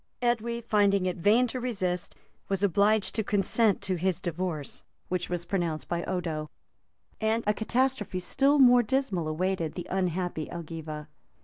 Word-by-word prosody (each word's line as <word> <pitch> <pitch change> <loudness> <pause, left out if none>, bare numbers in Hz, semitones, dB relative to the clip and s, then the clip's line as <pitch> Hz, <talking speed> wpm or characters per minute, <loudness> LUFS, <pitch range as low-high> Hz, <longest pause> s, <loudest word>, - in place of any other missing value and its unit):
[] - - -48
Edwy, 235 0 0
finding 200 -4 +2
it 180 - -1
in - - -9
vain 220 +7 +5
to 250 +1 -3
resist, 190 -8 -2 0.3
was 195 0 0
obliged 200 +2 +3
to 220 - 0
consent 205 +1 +2
to 185 -1 -1
his 180 0 0
divorce, 170 -4 -3 0.3
which 180 -1 -2
was 175 -1 -2
pronounced 170 -6 -2
by 170 0 -2
Odo;[] 160 -4 -3 0.7
and 220 +1 +1
a 210 - +3
catastrophe 230 -3 0
still 275 +10 +2
more 245 -3 +7
dismal 210 - 0
awaited 170 0 -1
the 175 - -5
unhappy 180 -3 -1
Elgiva. 160 -2 -6
190 Hz, 155 wpm, -28 LUFS, 175-220 Hz, 0.7 s, more